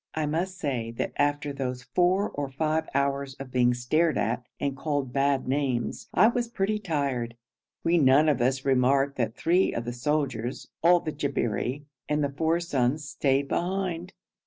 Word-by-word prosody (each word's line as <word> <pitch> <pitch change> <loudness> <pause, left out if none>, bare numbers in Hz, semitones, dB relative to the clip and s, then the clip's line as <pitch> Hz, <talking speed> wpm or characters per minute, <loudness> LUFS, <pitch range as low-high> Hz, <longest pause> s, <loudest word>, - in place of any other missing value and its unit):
I 155 -1 0
must 175 +5 -2
say 130 -9 -2
that - - -2
after 145 0 0
those 130 -2 -4
four 180 +8 +1
or 140 -1 -3
five 155 +3 -1
hours 140 -1 0
of 135 -2 -9
being 125 -1 +3
stared 155 +7 +1
at 115 +4 -1 0.2
and 140 -1 -1
called 140 -3 -2
bad 140 -1 +1
names, 130 -3 -1
I 185 - +5
was 240 0 0
pretty 215 -1 -1
tired. 140 - -2 0.5
We 170 +1 +3
none 140 +2 +5
of 140 -5 +2
us 130 +2 +1
remarked 135 +1 +2
that 115 -3 -1
three 180 +3 +2
of 120 - -3
the 120 - -3
soldiers, 125 -2 -2
all 175 +1 +5
the 155 - -3
Jabberi, 140 -2 -2 0.3
and 150 0 +1
the 140 - -1
four 160 +2 +1
sons 145 -3 0
stayed 140 -1 +1
behind. 180 -1 -2
140 Hz, 170 wpm, -27 LUFS, 130-160 Hz, 0.5 s, I